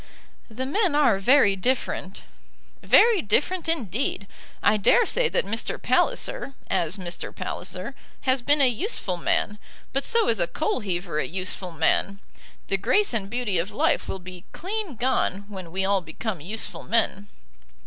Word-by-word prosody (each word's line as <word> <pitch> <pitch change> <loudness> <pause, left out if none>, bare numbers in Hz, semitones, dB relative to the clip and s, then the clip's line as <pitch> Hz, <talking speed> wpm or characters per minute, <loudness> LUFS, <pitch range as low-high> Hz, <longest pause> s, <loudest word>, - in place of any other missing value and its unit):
"The 240 +4 -4
men 340 +3 +1
are 240 -10 +4
very 205 -2 +5
different." 195 -3 -2 0.6
"Very 455 -5 +5
different 325 - +1
indeed. 240 - -1 0.4
I 210 - +4
dare 450 - +4
say - - +2
that - - 0
Mr. 225 +3 -3
Palliser, - - 0 0.2
as 170 +4 0
Mr. 175 -2 -5
Palliser, - - -5 0.3
has 260 -1 +2
been 290 +4 +4
a 270 - +7
useful 245 - 0
man. 210 +4 -1 0.3
But 275 +1 0
so 460 -1 +2
is 225 - +2
a 170 - +2
coal 315 - -1
heaver 175 -6 -3
a - - -1
useful 185 0 -4
man. 165 +5 +1 0.5
The 195 - 0
grace 405 - +2
and 200 -4 -2
beauty 230 -6 -1
of 175 +4 -2
life - - 0
will - - -3
be 180 0 -11
clean 390 - -4
gone 220 -5 0
when 185 -5 -8
we 190 +2 -1
all 195 -1 +2
become 175 +2 -5
useful 210 +8 -1
men." 215 -3 0
215 Hz, 160 wpm, -25 LUFS, 190-280 Hz, 0.6 s, a